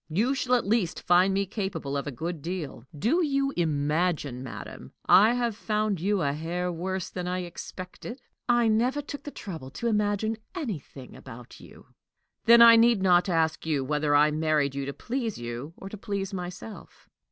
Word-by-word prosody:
"You 215 - +1
shall 255 -2 +1
at 245 - 0
least 200 -4 0
find 180 +2 +4
me 195 +1 +1
capable 190 -8 -4
of 140 +1 -2
a - - -2
good 160 +5 -5
deal. 155 -7 -5
Do 270 - +2
you 275 -2 0
imagine, 150 -3 0
madam, 130 -3 -9
I 215 +4 +6
have 240 -3 -1
found 210 -4 -1
you 200 -1 +1
a 140 0 +1
hair 175 +4 -3
worse 185 +2 -4
than 180 -1 -4
I 180 0 -2
expected?" 185 +7 -8 0.3
"I 240 -1 +4
never 245 +6 +1
took 285 0 -7
the - - -4
trouble 165 - -8
to 185 - -7
imagine 210 0 0 0.2
anything 175 - -6
about 120 +1 -12
you." - - -15 0.6
"Then 235 +1 +9
I 230 0 +9
need 230 -3 +4
not 180 0 +4
ask 160 -2 +1
you 145 -4 +1
whether 150 +1 +1
I 150 +1 +5
married 155 -2 +1
you 140 0 -4
to - - -2
please 235 - -3
you 120 +7 -6
or 195 - -9
to 215 - -8
please 200 -2 -3
myself?" 180 +4 -8
185 Hz, 180 wpm, -27 LUFS, 155-220 Hz, 0.6 s, Then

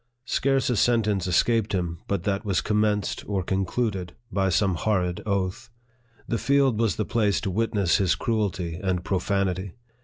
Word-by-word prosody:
Scarce 135 +2 +1
a - - +1
sentence 105 -5 +2
escaped 110 +4 +2
him 85 -3 -2
but 100 -4 -1
that 100 0 -1
was 100 -4 +1
commenced 105 -1 0
or 95 -2 0
concluded 95 0 -1 0.2
by 95 -2 +1
some 95 +2 +2
horrid 90 -1 0
oath. 100 +4 -2 0.6
The 115 - -1
field 135 0 +2
was 115 -6 +2
the 110 - -1
place 105 -4 +1
to 95 - -2
witness 100 -3 +1
his 95 -4 +2
cruelty 95 -7 -2
and 90 -2 -1
profanity. 95 -1 -1
100 Hz, 155 wpm, -25 LUFS, 95-110 Hz, 0.6 s, sentence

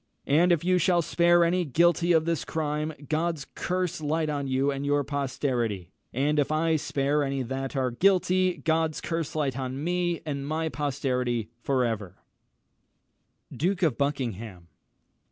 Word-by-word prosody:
And 170 +5 +4
if 170 -2 +2
you 185 0 +3
shall 175 0 +3
spare 175 +2 +4
any 180 +2 +2
guilty 170 +3 +3
of 160 -2 +4
this 165 -3 -1
crime, 150 0 -2 0.2
God's 160 -2 -1
curse 180 -2 -2
light 155 +1 0
on 140 -2 -2
you 135 +2 +1
and 140 0 -4
your 145 0 +1
posterity! 125 - -2 0.2
and 145 +4 +1
if 145 - +1
I 160 +1 +2
spare 145 0 0
any 135 -1 -1
that 135 +2 -4
are 130 -2 0
guilty, 185 +4 +2
God's 160 -1 +1
curse 165 -1 -3
light 140 -4 -1
on 130 +2 -4
me 175 0 0
and 140 -2 -4
my 160 +1 -1
posterity 125 -6 -2
for 130 -1 +1
ever!" 105 -5 -3 1.4
[Illustration: - - -9
DUKE 185 +3 0
OF 155 -8 +2
BUCKINGHAM. 115 -10 -3
150 Hz, 155 wpm, -27 LUFS, 135-170 Hz, 1.4 s, And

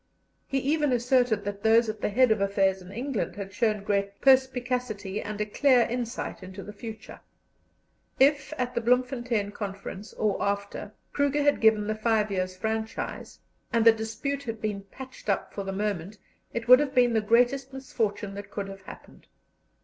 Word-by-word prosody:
He 270 - -1
even 295 +2 +1
asserted 245 -3 +2
that 205 0 -4
those 225 +1 +4
at 215 -1 -5
the - - 0
head 250 +3 +4
of 215 -2 +2
affairs 195 -1 +1
in 180 +1 -12
England 245 +1 -3
had 195 -1 -7
shown 210 -1 0
great 200 -1 -1
perspicacity 250 -6 +1
and 210 0 -6
a 210 - 0
clear 255 +4 +4
insight 240 -2 -3
into 190 +1 -9
the 210 - -9
future. 220 +1 -9 1.0
If 280 +1 +4
at 250 -1 -2
the - - -1
Bloemfontein 240 -3 +1
Conference, 200 0 -7
or 210 -2 -1
after, 200 +1 -3 0.2
Kruger 285 0 +1
had 290 0 +2
given 220 -2 +4
the 215 - -1
five 215 -1 +1
years' 185 -1 -2
franchise, 220 +2 -4 0.3
and 230 -2 +2
the 230 - +10
dispute 225 +6 -3
had 225 -2 -4
been 205 -2 -3
patched 265 -3 -10
up 200 - -1
for 200 - -4
the 195 - -4
moment, 200 -1 -3 0.3
it 235 0 -4
would 250 +1 +9
have 290 -2 -2
been 245 -2 +4
the 220 - +2
greatest 245 +5 +2
misfortune 215 -6 -3
that 200 0 -8
could 200 -1 -5
have 195 0 -9
happened. 190 - -13
220 Hz, 175 wpm, -27 LUFS, 200-250 Hz, 1.0 s, the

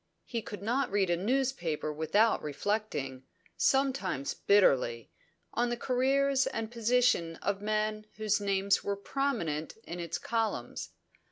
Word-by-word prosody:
He 235 -2 -3
could 205 -2 -8
not 250 +6 +1
read 195 -3 +1
a - - +4
newspaper 190 - -1
without 205 +9 +2
reflecting, 150 -5 -2 0.3
sometimes 260 - +1
bitterly, 125 - +3 0.4
on 240 +1 +1
the 240 - -2
careers 270 +2 +2
and 225 -4 -3
position 235 -8 +2
of 200 +3 -2
men 215 0 -1
whose 215 -1 +1
names 200 0 +2
were 200 - -1
prominent 200 - -2
in 175 +1 -6
its 170 -1 -3
columns. 220 - -2
215 Hz, 125 wpm, -31 LUFS, 170-245 Hz, 0.4 s, a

